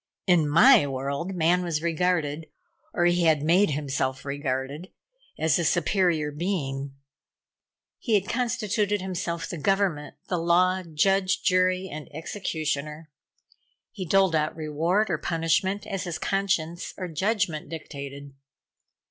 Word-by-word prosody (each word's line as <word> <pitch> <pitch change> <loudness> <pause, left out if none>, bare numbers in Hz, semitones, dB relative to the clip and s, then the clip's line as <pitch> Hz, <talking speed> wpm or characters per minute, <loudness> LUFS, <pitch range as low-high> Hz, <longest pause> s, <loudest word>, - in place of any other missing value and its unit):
In 170 -5 +3
my 190 - +6
world 140 +7 -3
man 175 +1 +3
was 165 -3 -2
regarded, 165 -2 0 0.4
or 175 - +1
he 175 0 +3
had 155 -3 +3
made 180 +6 +4
himself 135 -2 -2
regarded, 140 +4 -3 0.5
as 160 -1 +2
a - - 0
superior 170 -2 +1
being. 140 -5 -3 1.0
He 225 -4 +1
had 200 -1 +1
constituted 215 -4 0
himself 175 -3 -3
the 170 - -6
Government, 190 -5 0
the 180 - -1
Law, 180 +2 +3
Judge, 185 +3 +1
Jury 185 0 +2
and 150 -3 -8
Executioner. 155 -3 -4 0.8
He 195 - -6
doled 190 0 +3
out 155 0 0
reward 165 +6 0
or 160 - 0
punishment 165 +4 0
as 195 -2 -4
his 170 -3 -3
conscience 175 -3 -1
or 185 - -4
judgment 175 -3 -1
dictated. 140 -3 -8
170 Hz, 125 wpm, -26 LUFS, 150-190 Hz, 1.0 s, my